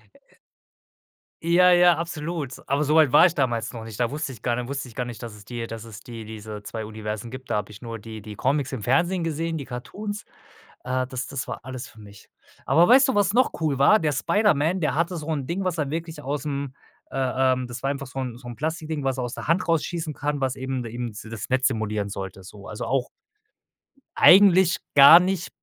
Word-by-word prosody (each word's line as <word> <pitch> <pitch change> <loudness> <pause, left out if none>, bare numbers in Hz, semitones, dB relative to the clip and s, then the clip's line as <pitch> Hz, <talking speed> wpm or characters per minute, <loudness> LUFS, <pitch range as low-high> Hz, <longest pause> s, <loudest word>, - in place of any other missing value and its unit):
Äh - - -26 1.1
Ja, 180 +2 +5
ja, 175 -1 +6
absolut. 160 -4 -4
Aber 140 +2 +2
so 150 +1 +1
weit 155 -5 +5
war - - +8
ich 175 - +3
damals 120 -5 -1
noch 115 -1 -7
nicht. 110 0 -9
Da 120 +1 +1
wusste 150 -1 -3
ich 115 - -13
gar 120 -1 +1
nicht 125 0 -4
wusste 135 -1 -4
ich 115 - -13
gar 125 - -3
nicht, 120 -1 -8
dass 115 -2 -7
es 105 -1 -13
die 120 +1 -5
dass 115 0 -8
es 110 -2 -11
die 115 -2 -9
diese 110 -1 -8
2 110 +1 -6
Universen 110 +1 -6
gibt. 130 0 -9
Da - - 0
habe 105 0 -3
ich 105 - -13
nur 115 -1 -6
die 110 0 -9
die 105 0 -9
Comics 140 +3 0
im 110 -6 -5
Fernsehen 170 - +1
gesehen 165 +1 -2
die 140 - -6
Cartoons. 205 +12 -6 0.6
Äh, 130 0 -1
das 130 -1 -5
das 140 -2 -4
war - - -6
alles 130 -1 -7
für 110 - -17
mich. 100 -1 -15 0.4
Aber 165 +5 +5
weißt 260 +2 +7
du, 265 - 0
was 205 -1 +2
noch 255 +1 +3
cool 145 -4 0
war? 210 +11 +5
Der 155 -2 +1
Spiderman, 180 - +2
der 155 -2 0
hatte 170 +2 0
so 155 0 -7
'n 140 -4 -2
Ding, 180 +5 -2
was 180 -3 -2
er 145 -2 -1
wirklich 160 -1 -5
ausm, 140 -1 -4 0.4
äh, - - -6 0.4
ähm 125 -1 -2
das 120 +2 -8
war 135 - +1
einfach 140 -2 -4
so 135 - -8
'n 125 -3 -4
so 120 -1 -11
'n 120 - -7
Plastikding, 155 -1 -3
was 135 0 -1
er - - -1
aus 120 0 -4
der - - -7
Hand 170 +2 +1
rausschießen 165 -1 -1
kann, 145 0 -3
was 130 0 -1
eben 130 -1 -3
de 115 - -7
eben 120 -1 -4
das 110 -2 -7
Netz 130 +1 +3
simulieren 105 -4 -2
sollte 95 -1 -7
so. 100 +2 -12
Also 105 - -6
auch 130 -2 0 1.1
eigentlich 190 -2 +7 0.2
gar 140 +5 +10
nicht 180 -1 -1
135 Hz, 230 wpm, -24 LUFS, 115-160 Hz, 1.1 s, gar